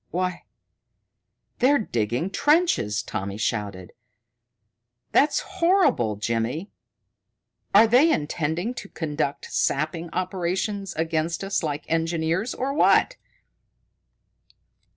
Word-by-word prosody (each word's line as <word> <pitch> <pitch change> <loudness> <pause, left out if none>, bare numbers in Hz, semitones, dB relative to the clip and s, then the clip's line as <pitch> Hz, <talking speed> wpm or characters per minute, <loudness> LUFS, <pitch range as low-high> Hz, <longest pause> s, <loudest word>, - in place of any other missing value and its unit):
"Why, 180 0 -3 1.1
they're 275 +3 +4
digging 120 - -2
trenches!" 295 - +2
Tommy 100 +1 -5
shouted. 100 -5 -3 1.2
"That's 295 +1 +3
horrible, 330 - +2
Jimmy! 115 - -2 1.0
Are 215 +3 +9
they 255 +9 +5
intending 160 +8 -1
to 205 -5 -8
conduct 150 -3 -3
sapping 160 +4 -1
operations 185 +2 -2
against 160 +2 -1
us 195 0 -1
like 150 -2 -3
engineers, 165 +6 -1
or 270 +2 -2
what?" - - +3
170 Hz, 90 wpm, -24 LUFS, 145-210 Hz, 1.2 s, Are